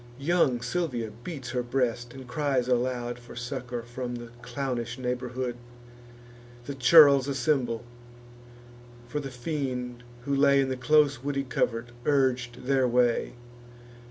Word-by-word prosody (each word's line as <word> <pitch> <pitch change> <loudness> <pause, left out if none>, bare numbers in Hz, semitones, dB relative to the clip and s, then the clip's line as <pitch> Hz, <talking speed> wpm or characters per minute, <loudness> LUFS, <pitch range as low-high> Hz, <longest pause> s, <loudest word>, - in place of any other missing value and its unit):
Young 135 -5 +2
Silvia 125 -6 -2
beats 135 -8 -6
her 125 -1 0
breast, 120 -1 -1
and 130 -1 -10
cries 130 -1 0
aloud 120 -1 0
For 120 0 -13
succour 125 -1 -5
from 120 +1 -5
the 120 -1 -8
clownish 120 -1 -3
neighbourhood: 125 0 -3 1.1
The 140 - -4
churls 140 0 +7
assemble; 125 -4 0 1.2
for 150 +5 -3
the 140 -2 -5
fiend, 125 -2 -4 0.2
who 140 -1 0
lay 140 0 +5
In 135 - 0
the 130 - -1
close 145 0 +3
woody 140 -1 -1
covert, 120 -2 -1 0.2
urg'd 130 -4 +1
their 130 -1 +3
way. 120 0 +2
125 Hz, 130 wpm, -27 LUFS, 120-140 Hz, 1.2 s, churls